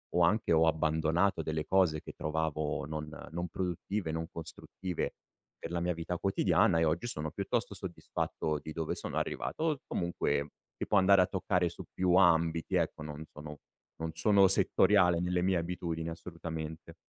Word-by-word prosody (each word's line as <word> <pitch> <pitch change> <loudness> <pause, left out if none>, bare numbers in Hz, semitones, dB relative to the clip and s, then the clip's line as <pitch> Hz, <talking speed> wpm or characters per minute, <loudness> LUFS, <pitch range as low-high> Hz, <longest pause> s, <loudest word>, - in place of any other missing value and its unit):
o 90 - +4
anche 105 +3 +3
ho 80 0 +5
abbandonato 80 +3 +2
delle 80 0 -2
cose 90 -5 +3
che - - -9
trovavo 75 -1 -2
non 75 0 -5 0.2
non 85 +1 -3
produttive, 90 +1 -3
non 80 0 -3
costruttive 85 +2 -5 0.4
per - - -6
la 85 0 -1
mia 90 +1 +1
vita 85 +1 -4
quotidiana, 95 -3 +3
e 80 - +3
oggi 80 +8 0
sono 80 -9 -3
piuttosto - - -2
soddisfatto 75 -1 -3
di 80 - -6
dove 80 0 -2
sono - - -4
arrivato. - - -2
O 160 -2 +2
z 135 - -20
comunque 85 -4 -1 0.3
che - - -4
può 105 - +3
andare 95 0 +6
a - - +5
toccare 90 -2 0
su - - -9
più 90 -1 +2
ambiti, 85 -1 +3
ecco, 80 -3 0
non 75 0 -6
sono 75 0 -9 0.4
non 80 0 -3
sono 100 0 +5
settoriale 95 -2 +4
nelle 90 0 0
mie 95 +1 +2
abitudini, 85 -1 -2
assolutamente. 80 -1 -7
85 Hz, 170 wpm, -31 LUFS, 80-90 Hz, 0.4 s, andare